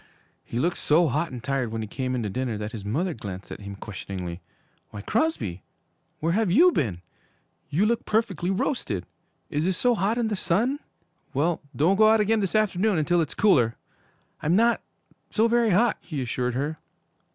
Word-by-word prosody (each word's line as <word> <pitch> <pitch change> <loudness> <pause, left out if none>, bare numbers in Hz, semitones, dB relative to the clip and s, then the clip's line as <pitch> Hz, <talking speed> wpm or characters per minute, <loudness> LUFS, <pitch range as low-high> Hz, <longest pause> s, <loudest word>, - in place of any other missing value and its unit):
He 115 - -6
looked 175 +7 0
so 160 +2 +3
hot 155 +5 -1
and 125 -2 -7
tired 135 -4 -1
when 110 0 -3
he - - -5
came 130 +3 -3
in 120 - -1
to 105 - -2
dinner, 125 -1 -2
that 105 +1 -5
his 110 -4 -7
mother 160 - -1
glanced 100 -5 -8
at - - -6
him 100 -1 -7
questioningly. 95 -3 -6 0.5
'Why, 105 - -8
Crosby, 160 - -1 0.6
where 165 +2 0
have 215 0 +2
you 330 - +6
been? 95 - -1 0.7
You 165 +9 +2
look 235 +1 +1
perfectly 210 -6 0
roasted. 185 - -1 0.5
Is 150 +4 0
is 185 -2 0
so 245 -1 +3
hot 215 +2 0
in 235 -2 +1
the 210 - 0
sun? 215 +11 +1 0.6
Well, 160 +5 +1
don't 175 +7 +3
go 215 0 +6
out 220 0 +5
again 215 +1 +2
this 195 0 -1
afternoon 210 -2 +2
until 170 +3 +2
it's 155 - -3
cooler.' 125 - +4 0.7
'I'm 160 +4 +2
not 235 +3 +3 0.5
so 225 +1 +3
very 235 -1 +3
hot,' 215 +5 +3
he 155 -5 -5
assured 125 -1 -2
her. 150 +4 -2
165 Hz, 185 wpm, -26 LUFS, -, 0.7 s, you